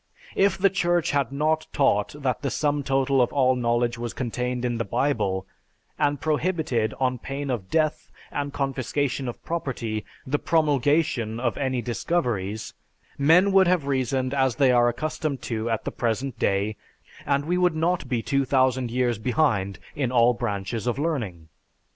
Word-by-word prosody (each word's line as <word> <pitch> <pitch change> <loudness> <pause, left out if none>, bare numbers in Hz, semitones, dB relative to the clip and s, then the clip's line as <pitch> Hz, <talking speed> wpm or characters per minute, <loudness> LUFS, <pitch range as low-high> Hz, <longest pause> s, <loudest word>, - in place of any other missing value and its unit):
If 195 -1 +3
the 195 0 +3
Church 175 -2 +1
had 140 -3 0
not 155 +3 0
taught 135 -5 +1
that 130 -5 -1
the 140 - -1
sum 145 0 0
total 135 -1 +2
of 120 - +2
all 130 -2 +3
knowledge 120 -1 0
was 120 -1 -4
contained 125 0 -2
in 120 -2 -1
the - - +1
Bible, 105 -5 0 0.5
and 145 -2 +1
prohibited, 155 - 0
on 130 -1 0
pain 140 +2 -4
of 100 -7 -4
death 155 -1 0 0.2
and 145 0 -3
confiscation 135 -1 -2
of 120 - -7
property, 120 -10 -3 0.2
the 145 +2 0
promulgation 145 -6 +1
of 120 -2 0
any 130 -3 -1
discoveries, 115 - -2 0.5
men 170 +8 +5
would 190 -1 +5
have 175 -5 +2
reasoned 130 -1 0
as 130 -3 +2
they 135 -3 +4
are 120 -1 +4
accustomed 145 0 -3
to 115 -1 -2
at 115 -1 -1
the - - -2
present 120 +1 -2
day, 100 +2 0 0.5
and 140 0 0
we 180 +3 0
would 180 -2 +3
not 170 +3 0
be 120 -3 -1
2000 130 -2 +1
years 120 -2 0
behind 110 - +1 0.2
in 135 -5 -1
all 120 -1 +5
branches 105 0 -3
of 120 - 0
learning. 115 - -3
130 Hz, 160 wpm, -25 LUFS, 120-145 Hz, 0.5 s, men